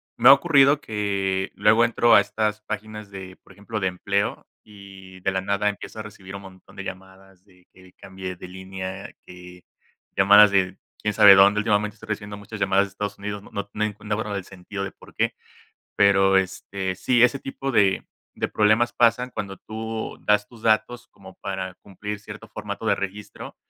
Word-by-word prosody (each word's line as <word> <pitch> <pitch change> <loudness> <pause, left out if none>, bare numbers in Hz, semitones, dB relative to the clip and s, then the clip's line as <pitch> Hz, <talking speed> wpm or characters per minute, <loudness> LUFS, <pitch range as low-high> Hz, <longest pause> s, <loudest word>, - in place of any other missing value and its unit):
me 120 +2 +6
ha - - +12
ocurrido 140 -1 +4
que 100 -5 -2
luego 110 +3 +4
entro 120 0 +4
a 100 - +8
estas 105 +1 -2
páginas 105 -1 -7
de, 95 -1 -9
por - - -19
ejemplo, 105 +1 -6
de 95 - +1
empleo 100 +3 -2 0.2
y 95 -2 -14
de 95 - 0
la 95 - -1
nada 100 +2 0
empiezo 105 +1 -4
a - - -4
recibir 100 -2 -11
un 100 - -8
montón 95 0 -15
de 100 - -5
llamadas, 95 0 -11
y 90 -3 -25
que 95 -1 -18
cambié 95 -2 -8
de - - -9
línea, 95 +1 -7 0.2
que 90 0 -13 0.5
llamadas 105 +1 +7
de 95 -1 +1 0.2
quién 105 -1 -1
sabe 100 0 +9
dónde. 100 +2 +6
Últimamente 105 -1 0
estoy 110 0 -14
recibiendo 105 -1 -5
muchas 105 +2 -9
llamadas 100 0 +3
de - - -11
Estados 100 +1 -5
Unidos, 100 0 -5
no - - -16
no 100 0 -5
no 105 - -1
enc 105 -1 -4
no 105 0 -2
veo 110 -2 -4
del 100 -2 -4
sentido 100 +1 -7
de 95 - -8
por - - -17
qué. - - 0 0.6
Pero, 95 -1 +4
este, 95 0 -2
sí, 120 +6 +3
ese 125 +3 +3
tipo 135 0 -5
de 100 -4 +2 0.3
de - - -1
problemas 110 +3 +3
pasan 120 +1 +2
cuando 100 -5 -6
tú 110 0 -6
das 105 0 +3
tus 115 0 -17
datos 110 +2 +1
como 95 -1 -15
para 95 -1 -5
cumplir 105 +2 -7
cierto 105 - -11
formato - - -6
de - - +3
registro, 100 +1 -7
100 Hz, 190 wpm, -24 LUFS, 95-110 Hz, 0.6 s, ha